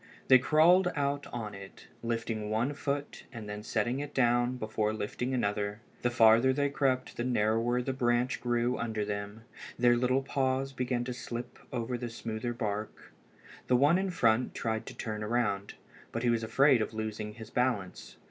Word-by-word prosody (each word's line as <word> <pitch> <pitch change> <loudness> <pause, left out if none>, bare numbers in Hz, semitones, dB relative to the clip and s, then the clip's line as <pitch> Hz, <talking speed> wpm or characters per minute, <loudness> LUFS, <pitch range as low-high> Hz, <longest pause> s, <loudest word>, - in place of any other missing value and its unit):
They 130 -1 +9
crawled 175 +6 +5
out 145 -1 -1
on 110 -3 -5
it, 100 0 -11 0.2
lifting 115 -2 -2
one 115 +6 0
foot 145 0 -4
and 115 -5 -8
then 105 0 -5
setting 120 +4 -1
it 145 0 -6
down 120 0 +2
before 110 -2 -1
lifting 110 +4 -3
another. 105 -4 -1 0.2
The 120 - +2
farther 115 +2 +5
they 140 +1 0
crept 130 -2 0
the 120 - -1
narrower 120 +1 +1
the 135 - -2
branch 120 0 +1
grew 120 0 0
under 110 -2 -2
them. 100 +1 -5 0.3
Their 120 0 +5
little 130 +2 +1
paws 135 0 -1
began 125 -1 -1
to 125 0 -4
slip 120 0 -6
over 120 0 -3
the 120 0 -4
smoother 115 +1 -4
bark. 110 -3 -5 0.5
The 125 - +4
one 145 +7 +4
in 195 0 -1
front 120 -8 +2
tried 110 -1 -2
to - - -8
turn 105 -1 -4
around, 105 -3 -1 0.4
but 115 - -3
he 120 - +3
was 115 -1 +1
afraid 130 +3 +4
of 110 +1 -3
losing 110 -1 -4
his 110 -1 -10
balance. 120 -7 -2
120 Hz, 175 wpm, -30 LUFS, 110-130 Hz, 0.5 s, They